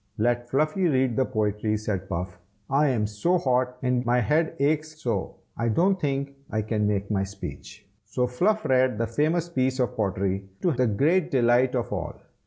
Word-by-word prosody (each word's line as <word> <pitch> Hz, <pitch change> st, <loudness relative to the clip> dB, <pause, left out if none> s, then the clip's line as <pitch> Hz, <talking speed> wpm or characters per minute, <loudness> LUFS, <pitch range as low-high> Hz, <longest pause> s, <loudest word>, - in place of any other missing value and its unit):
"Let 120 Hz, +2 st, 0 dB
Fluffy 155 Hz, +7 st, +1 dB
read 130 Hz, -5 st, +1 dB
the 130 Hz, -, +2 dB
pottery!" 105 Hz, -2 st, -1 dB
said 100 Hz, -3 st, -4 dB
Puff. 90 Hz, +2 st, -4 dB, 0.3 s
"I 145 Hz, +2 st, +4 dB
am 120 Hz, -6 st, +1 dB
so 105 Hz, -, +1 dB
hot, 125 Hz, -4 st, 0 dB
and 125 Hz, -1 st, +1 dB
my 120 Hz, 0 st, +2 dB
head 155 Hz, +7 st, +1 dB
aches 155 Hz, +2 st, 0 dB
so, 115 Hz, -9 st, -2 dB, 0.2 s
I 115 Hz, 0 st, -1 dB
don't 185 Hz, -, +2 dB
think 140 Hz, -1 st, -1 dB, 0.2 s
I 110 Hz, -1 st, -1 dB
can 105 Hz, -1 st, 0 dB
make 100 Hz, 0 st, -1 dB
my 100 Hz, -2 st, +1 dB
speech." 95 Hz, +1 st, -8 dB, 0.2 s
So 125 Hz, +4 st, -1 dB
Fluff 200 Hz, -, 0 dB
read 130 Hz, -3 st, +3 dB
the 115 Hz, -, 0 dB
famous 155 Hz, +8 st, 0 dB
piece 130 Hz, -5 st, 0 dB
of 125 Hz, 0 st, 0 dB
pottery, 95 Hz, -2 st, -1 dB
to 175 Hz, -, +3 dB
the 130 Hz, -3 st, +1 dB
great 155 Hz, -, +2 dB
delight 125 Hz, 0 st, +3 dB
of 120 Hz, -, -2 dB
all. -, -, -4 dB
125 Hz, 185 wpm, -26 LUFS, 105-145 Hz, 0.3 s, I